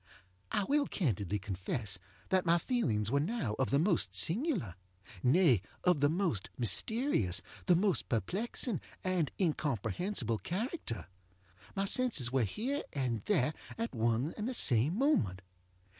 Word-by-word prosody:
I 205 - +1
will 285 +6 +2
candidly 105 - -1
confess 95 0 -3 0.3
that 185 -1 +3
my 170 0 +4
feelings 120 - 0
were 140 - +3
now 155 - -1
of 135 - +1
the 140 - +3
most 160 - +2
singularŌĆönay, 115 - +1 0.2
of 180 -4 +4
the 145 +1 +4
most 165 - 0
mysterious, 120 - +1 0.2
the 180 - +6
most 190 +1 +1
perplexing 200 - -1 0.2
and 180 -6 0
incomprehensible 140 - 0
character. 210 - -4 0.7
My 195 0 0
senses 200 - +1
were 130 -3 +2
here 255 - -2
and 125 -6 -1
there 155 -7 +2 0.2
at 230 +1 -3
one 115 +5 0
and 215 +3 -2
the 255 - -1
same 130 - +4
moment. 110 - +1
150 Hz, 130 wpm, -33 LUFS, -, 0.7 s, the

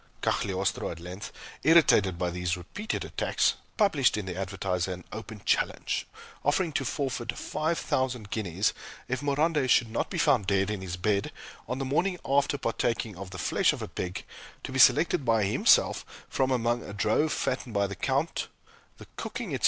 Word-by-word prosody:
Cagliostro, - - 0
at 85 - -7
length, 90 +4 -7 0.3
irritated 125 - +5
by 90 0 -1
these 90 +1 -1
repeated 205 - -4
attacks, - - +1 0.2
published 155 - +3
in 105 - -3
the 90 -2 -5
"Advertiser" 95 -1 -2
an 90 0 -9
open 110 -2 -8
challenge, - - 0 0.4
offering 160 +3 +1
to 135 - 0
forfeit 125 -3 -2
five 160 +2 -1
thousand 125 -8 -1
guineas 100 -2 0 0.3
if 130 +2 -2
Morande 145 -1 +1
should 120 -3 +4
not 115 - -1
be 185 - -4
found 145 - +3
dead 100 0 +2
in 105 -3 -3
his 90 -2 -5
bed 100 +2 0 0.4
on 125 - -2
the 135 - -2
morning 180 +8 +1
after 140 +1 +2
partaking 115 -3 -1
of 100 +1 -8
the 90 - -8
flesh - - +2
of - - -6
a - - -4
pig, 90 0 -5 0.4
to - - -5
be - - -2
selected - - +5
by 115 -3 +3
himself 100 - +4 0.2
from 130 -1 0
among 120 -1 +1
a 100 - -8
drove 110 +9 +1
fattened 125 -3 -2
by 100 0 +3
the 100 - -4
Count 140 - -1 0.5
the - - -11
cooking, - - -5
etc. - - -1
115 Hz, 175 wpm, -28 LUFS, 95-140 Hz, 0.5 s, irritated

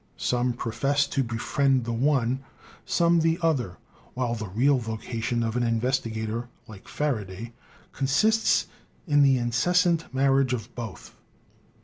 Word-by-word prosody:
Some 125 0 0
profess 135 +4 0
to 135 - -1
befriend 130 +2 0
the 120 - -2
one, 130 0 +1 0.5
some 170 -1 +3
the 165 0 +2
other, 130 - 0 0.4
while 125 -2 -1
the 110 -2 -4
real 130 +8 +2
vocation 115 +1 -3
of 115 0 -2
an 125 - +1
investigator, 115 -1 -1 0.2
like 105 -3 -13
Faraday, 115 -6 -3 0.4
consists 215 +12 +2 0.4
in 145 -4 +3
the 135 -2 +5
incessant 165 +8 +1
marriage 135 -1 +2
of 120 0 -5
both. 110 -7 -8
125 Hz, 125 wpm, -26 LUFS, 115-140 Hz, 0.5 s, the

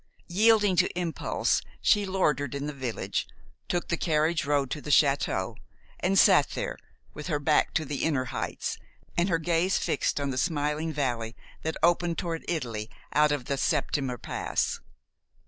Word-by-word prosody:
Yielding 205 +1 +4
to - - +4
impulse, 170 -2 0 0.2
she 205 -2 +3
loitered 150 -8 0
in 140 0 -3
the 150 - -4
village, 130 -5 -3 0.4
took 175 -1 -1
the 170 - +2
carriage 155 -1 +1
road 140 -2 +1
to 150 - -3
the 150 - -7
château, 140 0 +2 0.4
and 195 +2 +1
sat - - +6
there, - - -3 0.4
with - - -7
her 155 -5 +1
back 150 +1 +2
to 160 - 0
the 145 0 -3
inner 140 -5 +1
heights - - -3 0.4
and 175 +3 +2
her 165 - +3
gaze 170 +3 +1
fixed - - 0
on 140 -1 -1
the 130 - -1
smiling 150 0 0
valley 120 -6 -2 0.3
that 160 0 -3
opened 170 0 +3
toward 165 -3 -3
Italy 115 -10 -3 0.2
out 150 0 +4
of 145 -4 -1
the 140 - -1
Septimer 130 -3 0
Pass. - - -2
150 Hz, 165 wpm, -28 LUFS, 140-175 Hz, 0.4 s, sat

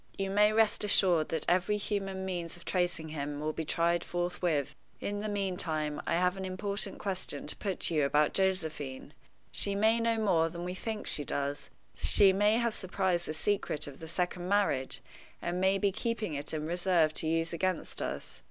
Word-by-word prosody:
You 195 0 -1
may 210 +1 +5
rest 215 -1 +3
assured 180 -6 +3
that 160 -2 -1
every 185 +4 +2
human 195 -2 -3
means 175 -2 -4
of 170 - -15
tracing 175 -3 -1
him 145 -1 -4
will 155 +1 -2
be 160 - -3
tried 170 +2 +1
forthwith. 175 -4 -1 0.3
In 205 0 -3
the 215 +1 -3
meantime, 180 -7 -1
I - - +2
have 180 +1 +2
an 190 - -4
important 200 +1 -3
question 185 -7 -2
to - - +2
put 195 -4 -3
to - - +2
you 150 -2 +3
about 150 +2 +3
Josephine. 160 -8 -1 0.4
She 200 -1 -1
may 220 +3 +3
know 230 0 +1
more 175 -7 +2
than 170 +1 -6
we 180 +1 -3
think 215 +3 -4
she 145 - +3
does; 140 +1 -3 0.2
she 195 -2 +5
may 205 +3 +3
have 235 -2 +1
surprised 185 -3 -1
the 155 - -3
secret 160 -3 -1
of 140 -2 -10
the 160 - -8
second 175 +1 -2
marriage, 195 -10 +1 0.4
and 175 +1 -2
may 190 +1 +3
be 200 0 +2
keeping 220 -3 -2
it 145 0 -3
in 155 -1 -3
reserve 175 -2 +2
to 160 - -2
use 165 +1 0
against 185 0 -2
us. - - -5
180 Hz, 190 wpm, -31 LUFS, 160-200 Hz, 0.4 s, may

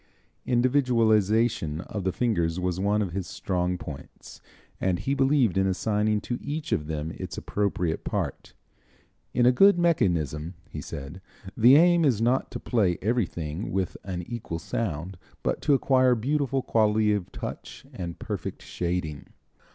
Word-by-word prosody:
Individualization 115 - +2
of 100 +1 -6
the 95 - +1
fingers 85 -6 0
was 90 0 -1
one 105 +2 +2
of 95 - -4
his 95 0 -4
strong 90 -1 -2
points, 75 -4 -10 0.4
and 95 -2 +1
he 130 +10 -1
believed 135 -8 +3
in 95 - +2
assigning 105 +2 +1
to 120 +4 -4
each 150 +2 -4
of 75 - 0
them 80 0 -3
its - - -6
appropriate 90 -5 -1
part. - - -4 0.8
"In 120 0 +2
a 125 - +7
good 195 +9 +6
mechanism," 85 - +1
he 75 - -7
said, 70 +6 -8 0.3
"the 120 +4 +7
aim 170 +2 +5
is 130 -8 +3
not 120 +3 +1
to - - -6
play 100 -8 +1
everything 90 -6 -2
with 95 -2 -1
an 90 -2 -4
equal 105 -4 -5
sound, 85 -1 -4 0.2
but - - -1
to 145 - +4
acquire 130 -2 +3
beautiful 135 +2 0
quality 110 -1 +2
of 100 -4 -3
touch - - -7
and 85 -2 -6
perfect - - -5
shading." 85 -4 -3
105 Hz, 150 wpm, -26 LUFS, 85-125 Hz, 0.8 s, a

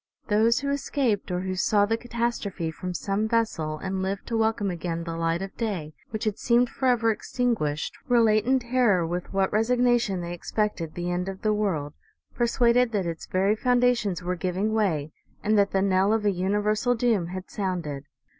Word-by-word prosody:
Those 220 +4 +3
who 280 0 -1
escaped, 265 -7 -1
or 180 0 -1
who 185 0 -3
saw 205 +2 +3
the 225 +2 +1
catastrophe 230 -7 -3
from 180 +3 -5
some 200 +4 -1
vessel, 195 -10 0
and 190 +2 -3
lived 195 +1 -3
to 230 - -1
welcome 220 -3 +1
again 170 -1 -3
the 165 -1 -5
light 165 +2 0
of 195 - -8
day, 185 -10 -3 0.2
which 215 0 -4
had 215 -2 -1
seemed 240 0 +3
forever 240 -4 +2
extin 245 +2 0
guished, 150 -7 -2 0.2
relate 225 -4 +4
in 265 +1 +4
terror 240 -8 +2
with 175 +2 -4
what 195 0 0
resignation 240 -3 +2
they 170 0 -5
ex 175 - -8
pected 210 -7 -1
the 175 0 -2
end 180 +2 -2
of 190 +3 -8
the 215 -1 +2
world, 170 -9 -1 0.4
persuaded 240 0 +2
that 200 -3 0
its 165 -1 -5
very 195 +3 +2
foun 245 +2 +2
dations 235 -8 +1
were 180 +1 -1
giving 185 +5 -1
way 165 -9 0 0.3
and 215 +1 +2
that 200 -1 +4
the 195 0 +1
knell 195 +1 +3
of 220 -1 0
a 205 - +4
universal 210 +6 +1
doom 225 -7 +1
had 185 +1 -7
sounded. 170 -8 -3
205 Hz, 190 wpm, -26 LUFS, 180-230 Hz, 0.4 s, relate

